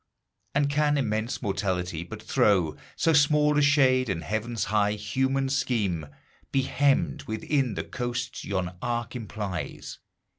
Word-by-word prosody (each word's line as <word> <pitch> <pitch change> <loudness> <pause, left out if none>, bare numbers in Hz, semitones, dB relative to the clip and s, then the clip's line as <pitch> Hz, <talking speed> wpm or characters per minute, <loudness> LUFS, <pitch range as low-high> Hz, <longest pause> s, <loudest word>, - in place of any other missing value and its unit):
And 145 0 +3
can 145 +1 +2
immense 110 -1 -1
Mortality 90 -5 -1
but 85 - -9
throw 90 -7 +2 0.2
So 165 - +2
small 150 0 +4
a - - +4
shade, 130 -4 +4
and 85 -4 -2
Heaven's 110 +1 -2
high 105 0 +2
human 130 +6 0
scheme 115 - 0 0.4
Be 135 - +2
hemmed 140 +1 +1
within 120 +2 -1
the - - -2
coasts 120 0 -4
yon 90 -2 -2
arc 120 0 -2
implies? 100 - -5
120 Hz, 135 wpm, -27 LUFS, 100-135 Hz, 0.4 s, small